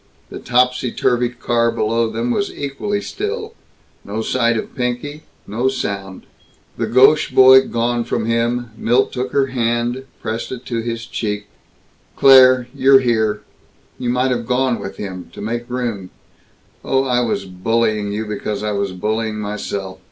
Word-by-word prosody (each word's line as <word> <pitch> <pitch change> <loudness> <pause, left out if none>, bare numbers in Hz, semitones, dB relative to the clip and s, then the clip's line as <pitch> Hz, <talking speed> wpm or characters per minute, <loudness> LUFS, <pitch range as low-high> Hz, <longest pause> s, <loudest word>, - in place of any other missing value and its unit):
The - - -7
topsy 125 0 +1
turvy 120 0 +1
car 120 -1 0
below 115 0 0
them 115 +2 -2
was 200 +9 -1
equally 175 +9 -3
still; 435 - -4 0.5
no 110 +2 -4
sight 120 -2 +1
of - - -5
Pinky, 125 +5 -3 0.2
no 115 +5 -1
sound. 100 -7 -4 0.5
The - - -2
gauche 135 +5 +5
boy 130 0 +7
gone 120 0 0
from 115 -1 -2
him, 115 +1 -1
Milt 120 +4 +1
took 125 0 -3
her 140 -1 +2
hand, 120 +1 -1
pressed 110 +1 -4
it 125 -1 -7
to 115 -2 -2
his 115 0 -4
cheek. 105 -3 -3 0.7
"Claire! 130 -2 +7
You're 135 -1 +5
here! 110 -4 +1 0.6
You 125 -1 -2
might 125 +1 +1
have 120 -2 -2
gone 125 -1 +1
with 95 0 -7
him, 95 -3 -7
to - - -11
make 120 +3 -4
room 115 -7 -3 0.7
Oh, 135 0 +1
I 125 -2 +1
was 120 -5 -1
bullying 105 +2 0
you 105 +2 -3
because 105 0 -4
I 105 - -1
was 100 -2 -2
bullying 110 +3 -2
myself! 100 -2 -5
120 Hz, 155 wpm, -19 LUFS, 110-130 Hz, 0.7 s, boy